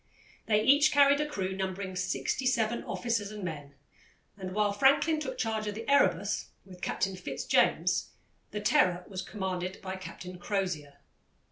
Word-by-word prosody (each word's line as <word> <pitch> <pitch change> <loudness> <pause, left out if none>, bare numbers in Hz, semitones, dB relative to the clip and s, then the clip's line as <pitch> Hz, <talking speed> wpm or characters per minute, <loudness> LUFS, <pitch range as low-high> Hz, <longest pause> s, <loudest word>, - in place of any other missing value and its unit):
They 215 -1 +3
each 290 +5 +5
carried 285 0 +5
a 300 - -1
crew 190 -9 -3
numbering 190 0 -3
sixty 255 +7 -1
seven 235 -2 +1
officers 230 -4 -1
and 210 -2 -7
men, 145 -5 -6 0.6
and 185 -1 -6
while 210 -1 +2
Franklin 285 +8 +4
took 295 -3 -5
charge 220 -2 -1
of 205 - -3
the 225 +1 -7
Erebus 205 -9 +2 0.2
with 180 -2 -13
Captain 195 0 -1
Fitz 185 - -5
James, - - +2 0.4
the 210 - -4
Terror 185 -7 +3
was 190 -2 -5
commanded 185 -2 -4
by 190 0 -5
Captain 180 -1 -9
Crozier. 175 -7 -2
200 Hz, 155 wpm, -30 LUFS, 185-235 Hz, 0.6 s, each